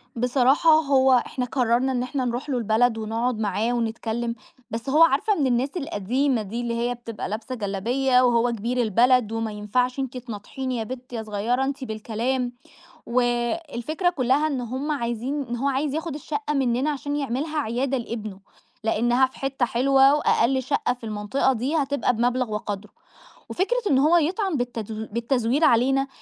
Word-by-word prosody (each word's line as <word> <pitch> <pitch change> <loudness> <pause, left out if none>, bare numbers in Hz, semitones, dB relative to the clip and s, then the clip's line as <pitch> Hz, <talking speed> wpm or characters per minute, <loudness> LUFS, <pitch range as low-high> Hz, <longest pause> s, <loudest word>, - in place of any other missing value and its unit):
بصراحة، 255 +6 +3
هو 265 -2 +3
إحنا 250 - -3
قرّرنا 250 +1 +1
إن 250 -1 -1
إحنا 260 0 -2
نرُوح 245 +4 -3
له 260 - 0
البلد 225 +1 +2
ونقعد 225 +2 -2
معاه 215 +3 0
ونتكلم، 230 0 -2 0.4
بس 230 +4 -4
هو 310 +4 +6
عارفة 330 +8 +3
من 275 - +2
الناس 250 +2 +1
القديمة 260 - 0
دي 215 +4 -4
اللي 235 -1 -2
هي 240 +1 -1
بتبقى 230 -3 -6
لابسة 225 +5 -4
جلابية 245 +5 +1
وهو 240 -1 +3
كبير 235 +3 -1
البلد، 235 +1 +3
وما 225 -1 -2
ينفعش 250 +5 -1
أنتِ 265 -1 -3
تناطحيني 250 +2 -5
يا 225 - -2
بِت 250 +2 -8
يا 225 -2 -3
صغيرة 220 +5 -1
أنتِ 270 0 -3
بالكلام، 240 +3 -2 0.5
و 240 +2 +1 0.6
الفكرة 310 +9 0
كُلّها 275 -1 +1
إن 275 -5 -2
هم 260 +5 -3
عايزين 255 +1 -2
إن 240 -2 -4
هو 260 +4 -1
عايز 275 +1 0
ياخد 320 -2 -3
الشقة 295 0 -3
منّنا 265 0 +1
عشان 290 0 -3
يعملها 290 +3 -2
عيادة 265 +2 -1
لابنُه، 215 -5 -6 0.4
لأنها 240 +4 +3
في 260 - -11
حتّة 270 -2 0
حلوة، 270 +4 +4
وأقل 265 -3 +2
شقة 280 -1 0
في 245 - -19
المنطقة 215 +5 0
دي 260 +6 -2
هتبقى 280 -5 +1
بمبلغ 245 0 0
وقدرُه، 210 -1 -4 0.6
وفكرة 400 +7 0
إنه 275 +1 +4
هو 345 +2 +5
يطعن 360 +2 0
بالتدو 225 -3 -4
بالتزوير 235 +4 0
علينا، 270 +2 +3
250 Hz, 165 wpm, -24 LUFS, 230-275 Hz, 0.6 s, هو